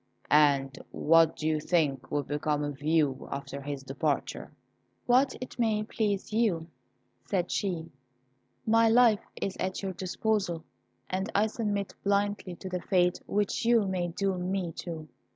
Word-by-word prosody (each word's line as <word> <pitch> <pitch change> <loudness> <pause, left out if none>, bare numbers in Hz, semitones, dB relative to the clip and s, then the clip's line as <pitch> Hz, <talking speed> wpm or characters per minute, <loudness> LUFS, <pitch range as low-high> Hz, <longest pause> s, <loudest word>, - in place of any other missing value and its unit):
and 140 -3 +4
what 165 0 +4
do 155 - -3
you 155 -1 +1
think 150 -5 0
will 145 -1 0
become 150 +1 -1
of 145 -1 -5
you 150 -3 +1
after 140 0 -5
his 140 -1 -5
departure?" 140 +2 -2 0.5
"What 255 +2 +4
it 255 - -8
may 220 -2 +2
please 210 -2 -2
you," 210 -8 +1 0.6
said 180 -3 -1
she; 170 -5 -2 0.7
"my 225 +1 +5
life 230 -2 +5 0.2
is 195 - -2
at 190 +1 -3
your 190 -1 -2
disposal, 185 -2 -1 0.4
and 190 +3 -2
I 205 +2 +4
submit 210 -3 -2
blindly 200 -2 0
to 190 - -8
the 180 -1 -3
fate 180 -1 +2
which 205 +2 0
you 230 -2 +4
may 185 -2 -1
doom 185 +1 -1
me 190 -3 -1
to." 160 -3 -6
180 Hz, 150 wpm, -29 LUFS, 155-205 Hz, 0.7 s, my